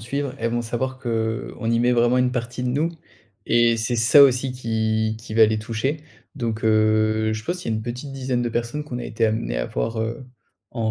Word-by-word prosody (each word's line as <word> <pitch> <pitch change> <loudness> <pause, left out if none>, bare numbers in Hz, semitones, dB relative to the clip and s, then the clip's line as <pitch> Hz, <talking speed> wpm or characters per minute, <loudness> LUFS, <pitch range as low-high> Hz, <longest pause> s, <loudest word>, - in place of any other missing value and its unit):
suivre, 140 +4 -3
elles 115 0 -1
vont 120 0 0
savoir 130 +3 -3
qu'on 115 -1 -2
y 115 - +2
met 120 +1 +3
vraiment 120 +1 +3
une 125 0 +2
partie 125 0 -4
de 125 - 0
nous 150 +6 +1 0.6
et 120 0 +3
c'est 115 +2 -1
ça 120 +5 +6
aussi 130 -1 +3
qui 110 -2 -1
qui 110 -1 -8
va 110 - +7
les 110 0 +1
toucher. 115 +7 -2 0.4
Donc 115 -4 -3
heu, 110 0 +2
je 110 - -6
pense, 180 +7 -3
il - - -5
y - - 0
a 110 - +1
une 110 - -3
petite 125 +4 -6
dizaine 130 -2 -2
de 120 - 0
personnes 120 +5 -3
qu'on 125 -5 -5
a - - -5
été 115 0 0
amené - - -1
à - - -2
voir, 110 - -2
heu, 115 +3 -4 0.4
en 115 -3 -1
115 Hz, 225 wpm, -23 LUFS, 110-125 Hz, 0.6 s, va